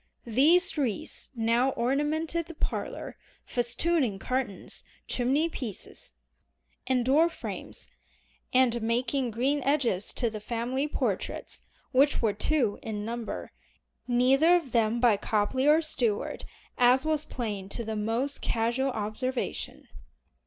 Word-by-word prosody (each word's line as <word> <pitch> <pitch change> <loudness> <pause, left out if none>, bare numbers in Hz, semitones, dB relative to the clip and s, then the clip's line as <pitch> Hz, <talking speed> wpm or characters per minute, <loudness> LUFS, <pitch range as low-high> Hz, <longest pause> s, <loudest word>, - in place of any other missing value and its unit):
These 305 - +4
wreaths 235 -8 -2
now 235 +3 +2
ornamented 305 +6 0
the 335 - -9
parlor, - - -4 0.3
festooning 245 - +1
curtains, 250 -2 -4 0.2
chimney 270 +6 +1
piece, 225 - -7 0.7
and 250 -2 +1
door 305 +6 +4
frames, - - -7 0.6
and 250 -2 +3
making 240 +3 0
green 265 +6 0
edges 255 -9 +1
to 235 -3 0
the 215 - -5
family 240 +6 -2
portraits, - - -3 0.3
which 280 +2 +4
were 220 -3 +1
two 235 -1 0
in 210 -2 -4
number, 235 0 -5 0.6
neither 265 +7 +4
of 325 -8 -1
them 230 -1 +2
by 235 -4 +4
Copley 220 +7 0
or 310 +2 +5
Stuart, 235 -9 -1 0.3
as 250 +3 +5
was 310 -1 +1
plain 210 -9 -4
to 235 - -2
the 220 0 -3
most 230 +7 -1
casual 235 +4 0
observation. 245 +3 -3
250 Hz, 120 wpm, -28 LUFS, 225-285 Hz, 0.7 s, or